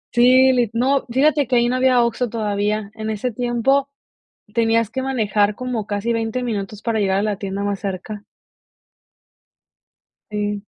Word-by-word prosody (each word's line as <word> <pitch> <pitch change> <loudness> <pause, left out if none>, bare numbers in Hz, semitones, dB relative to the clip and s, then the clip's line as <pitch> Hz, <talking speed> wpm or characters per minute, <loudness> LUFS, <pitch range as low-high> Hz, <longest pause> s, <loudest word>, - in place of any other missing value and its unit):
Sí, 255 +2 +6
li 240 -4 +1
no, 265 +4 +1
fíjate 290 +1 +2
que 255 - +1
ahí 240 0 +3
no 255 - 0
había 255 -2 +4
OXXO 235 0 -1
todavía. 210 -1 -2
En 220 0 -5
ese 220 +3 -2
tiempo 250 +4 +1 0.6
tenías 230 -1 +2
que 260 - -3
manejar 210 -5 +1
como 245 -5 -4
casi 210 +3 -1
20 230 +2 -2
minutos 210 -3 -4
para 225 -2 0
llegar 195 -1 +1
a - - 0
la 210 -2 -1
tienda 200 0 -4
más 200 -1 -2
cerca. 200 +1 -5 2.1
Sí. 205 -1 -3
225 Hz, 155 wpm, -20 LUFS, 205-250 Hz, 2.1 s, Sí